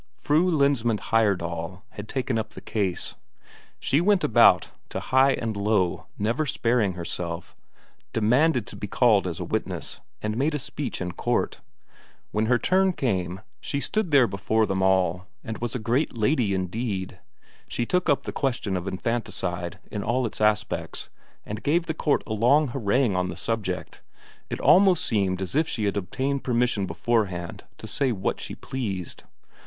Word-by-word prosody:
Fru 155 Hz, +9 st, +2 dB
Lensmand 140 Hz, -, +2 dB
Heyerdahl 90 Hz, -4 st, 0 dB
had 105 Hz, +1 st, -8 dB
taken 130 Hz, -3 st, -1 dB
up 110 Hz, -, -4 dB
the -, -, -6 dB
case. 100 Hz, -5 st, -2 dB, 0.7 s
She 145 Hz, -, +2 dB
went 200 Hz, 0 st, +3 dB
about 110 Hz, -, +5 dB, 0.2 s
to -, -, -3 dB
high 135 Hz, +1 st, +4 dB
and 115 Hz, -4 st, -2 dB
low, 100 Hz, -3 st, +1 dB
never 115 Hz, +9 st, 0 dB
sparing 115 Hz, -6 st, +1 dB
herself, 85 Hz, 0 st, -5 dB, 0.6 s
demanded 125 Hz, +3 st, +3 dB
to -, -, -9 dB
be 105 Hz, -, -5 dB
called 105 Hz, -3 st, +3 dB
as 85 Hz, -, -4 dB
a -, -, -2 dB
witness, -, -, -3 dB, 0.2 s
and 105 Hz, 0 st, -2 dB
made 150 Hz, +4 st, +1 dB
a -, -, +1 dB
speech 140 Hz, -2 st, -5 dB
in 90 Hz, -1 st, -2 dB
court. -, -, -1 dB, 0.7 s
When 110 Hz, +1 st, 0 dB
her 125 Hz, +1 st, +4 dB
turn 190 Hz, +6 st, +2 dB
came, 95 Hz, -, -1 dB, 0.2 s
she 140 Hz, -, -2 dB
stood 215 Hz, +5 st, -1 dB
there 140 Hz, -4 st, +6 dB
before 110 Hz, +2 st, +1 dB
them 95 Hz, -2 st, -1 dB
all 95 Hz, -1 st, +2 dB, 0.2 s
and 110 Hz, -, -5 dB
was 120 Hz, 0 st, -3 dB
a -, -, +1 dB
great 120 Hz, +4 st, 0 dB
lady 110 Hz, -3 st, +2 dB
indeed; 95 Hz, +1 st, -3 dB, 0.5 s
she 120 Hz, -, -2 dB
took 180 Hz, +5 st, +1 dB
up 145 Hz, -, +3 dB
the -, -, -4 dB
question 120 Hz, -7 st, -1 dB
of 90 Hz, +1 st, -3 dB
infanticide 95 Hz, -4 st, -2 dB
in 105 Hz, -, -3 dB
all 120 Hz, +4 st, 0 dB
its 110 Hz, -, -4 dB
aspects, 105 Hz, 0 st, 0 dB, 0.4 s
and 105 Hz, +1 st, -5 dB
gave 165 Hz, +4 st, +2 dB
the 160 Hz, -, -2 dB
court 150 Hz, -2 st, +1 dB
a 110 Hz, -, -3 dB
long 130 Hz, +7 st, +4 dB
harangue 120 Hz, -2 st, +1 dB
on 90 Hz, 0 st, 0 dB
the -, -, -5 dB
subject 105 Hz, -5 st, -3 dB, 0.5 s
it -, -, -4 dB
almost 190 Hz, -2 st, +5 dB
seemed 95 Hz, -4 st, 0 dB
as 95 Hz, -, -5 dB
if 155 Hz, +2 st, +3 dB
she 110 Hz, -, -3 dB
had 100 Hz, -, 0 dB
obtained 130 Hz, +8 st, -2 dB
permission 120 Hz, -5 st, +1 dB
beforehand 90 Hz, -1 st, -1 dB
to -, -, -9 dB
say 135 Hz, -2 st, 0 dB
what 95 Hz, -4 st, -2 dB
she -, -, -6 dB
pleased. 100 Hz, -9 st, -5 dB
110 Hz, 170 wpm, -25 LUFS, 95-135 Hz, 0.7 s, there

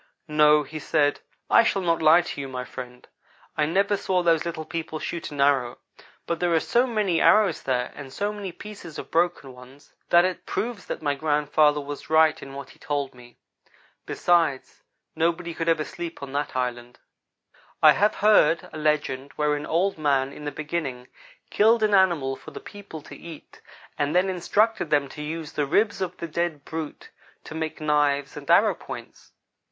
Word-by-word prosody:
"No," 150 Hz, -1 st, +5 dB
he 155 Hz, +1 st, -8 dB
said, 145 Hz, -1 st, +1 dB, 0.3 s
"I -, -, +6 dB
shall 200 Hz, -4 st, 0 dB
not 165 Hz, -2 st, +1 dB
lie 160 Hz, +2 st, +6 dB
to 165 Hz, -4 st, -6 dB
you, 135 Hz, -, -5 dB
my 130 Hz, -1 st, -5 dB
friend. 125 Hz, +1 st, -9 dB, 0.5 s
I 150 Hz, -, +1 dB
never 200 Hz, +5 st, +2 dB
saw 185 Hz, -2 st, 0 dB
those 165 Hz, -2 st, +2 dB
little 160 Hz, -2 st, -4 dB
people 160 Hz, -1 st, -5 dB
shoot 170 Hz, +2 st, -5 dB
an 145 Hz, -, -9 dB
arrow, 135 Hz, -4 st, +2 dB, 0.5 s
but 170 Hz, -1 st, -2 dB
there 175 Hz, -1 st, +1 dB
are -, -, +4 dB
so 240 Hz, +9 st, +1 dB
many 210 Hz, -8 st, 0 dB
arrows 215 Hz, -2 st, +4 dB
there, 125 Hz, -2 st, -1 dB
and 140 Hz, -2 st, -10 dB
so 205 Hz, +8 st, -2 dB
many 200 Hz, -3 st, -6 dB
pieces 180 Hz, -4 st, -10 dB
of -, -, -8 dB
broken 165 Hz, -6 st, 0 dB
ones, 125 Hz, +3 st, -16 dB, 0.2 s
that 175 Hz, +1 st, +6 dB
it 185 Hz, -1 st, -4 dB
proves 230 Hz, -4 st, -3 dB
that -, -, -5 dB
my 145 Hz, -1 st, +1 dB
grandfather 150 Hz, 0 st, +2 dB
was 145 Hz, +1 st, -7 dB
right 160 Hz, 0 st, +4 dB
in 135 Hz, 0 st, -9 dB
what 140 Hz, -1 st, -8 dB
he -, -, -20 dB
told 145 Hz, -3 st, -3 dB
me. 120 Hz, -1 st, -16 dB, 0.7 s
Besides, 165 Hz, -6 st, +1 dB, 0.3 s
nobody 170 Hz, +1 st, 0 dB
could 165 Hz, +1 st, -2 dB
ever 160 Hz, -2 st, +2 dB
sleep 170 Hz, -4 st, -7 dB
on 135 Hz, -, -7 dB
that 145 Hz, 0 st, -3 dB
island." 125 Hz, -1 st, -3 dB, 0.9 s
I -, -, +10 dB
have 210 Hz, +2 st, +2 dB
heard 170 Hz, -6 st, +4 dB
a 155 Hz, -, -6 dB
legend 145 Hz, -3 st, -1 dB
wherein 150 Hz, 0 st, -1 dB
Old 180 Hz, +2 st, 0 dB
man, 140 Hz, -2 st, +1 dB
in 150 Hz, -, -10 dB
the 145 Hz, -, -2 dB
beginning, 145 Hz, -5 st, -4 dB, 0.4 s
killed 220 Hz, +2 st, +4 dB
an 210 Hz, -1 st, +2 dB
animal 170 Hz, -9 st, +3 dB
for -, -, -12 dB
the -, -, -9 dB
people 200 Hz, -7 st, -10 dB
to -, -, -11 dB
eat, 165 Hz, -3 st, -12 dB, 0.4 s
and 145 Hz, +3 st, 0 dB
then 185 Hz, +1 st, +3 dB
instructed 200 Hz, +1 st, +1 dB
them 145 Hz, -2 st, +2 dB
to 150 Hz, -, -9 dB
use 155 Hz, 0 st, -5 dB
the 145 Hz, -2 st, -1 dB
ribs 205 Hz, +7 st, +1 dB
of 180 Hz, -2 st, -3 dB
the 170 Hz, -, -5 dB
dead 160 Hz, -3 st, -3 dB
brute 160 Hz, -2 st, -7 dB, 0.3 s
to -, -, -9 dB
make 160 Hz, -1 st, -4 dB
knives 145 Hz, -2 st, +1 dB
and -, -, -9 dB
arrow -, -, +5 dB
points. -, -, -11 dB
155 Hz, 185 wpm, -25 LUFS, 145-175 Hz, 0.9 s, I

